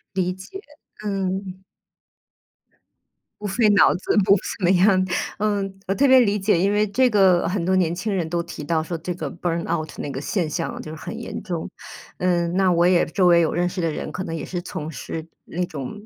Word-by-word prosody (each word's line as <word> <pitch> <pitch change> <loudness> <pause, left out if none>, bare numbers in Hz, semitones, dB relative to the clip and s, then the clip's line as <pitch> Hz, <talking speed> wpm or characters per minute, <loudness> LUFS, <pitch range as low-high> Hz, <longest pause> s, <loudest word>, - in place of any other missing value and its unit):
理 180 -1 0
解， 190 - -10 0.5
嗯。 190 -1 -3 1.8
不 210 - -3
费 215 +2 +2
脑 200 -2 +5
子， 190 - -1
不 200 - +6
怎 185 -1 -3
么 - - +4
样。 190 +1 +4 0.4
嗯， 200 -2 -1
我 195 - +1
特 280 - +3
别 260 0 +8
理 210 -3 +3
解， 195 -3 +2
因 200 +3 +2
为 210 +1 +3
这 245 +5 +2
个 190 -5 +4
很 180 -1 -1
多 185 +2 +1
年 175 -2 +2
轻 205 +3 -2
人 175 -4 -1
都 170 0 -1
提 150 -3 -8
到 160 0 0
说 170 0 -4
这 175 +2 -4
个 155 -5 -5
burn 170 0 -2
out 155 0 -2
那 145 - -4
个 135 - -4
现 170 +2 -1
象 165 +2 -3
就 155 - -8
是 - - -7
很 190 +10 -7
严 235 - -6
重， 175 -5 -4 0.5
嗯， 175 -1 +1
那 190 -1 +4
我 170 0 +3
也 180 -1 +4
周 180 +2 +2
围 170 -1 +6
有 165 - +1
认 175 0 +1
识 180 - -6
的 165 -2 +1
人 155 - -5
可 185 +3 -4
能 165 - -4
也 155 - -5
是 175 -1 -4
从 155 -2 -6
事 160 +4 -6 0.2
那 180 +1 -2
种 160 +9 -7
180 Hz, 250 characters per minute, -23 LUFS, 170-195 Hz, 1.8 s, 别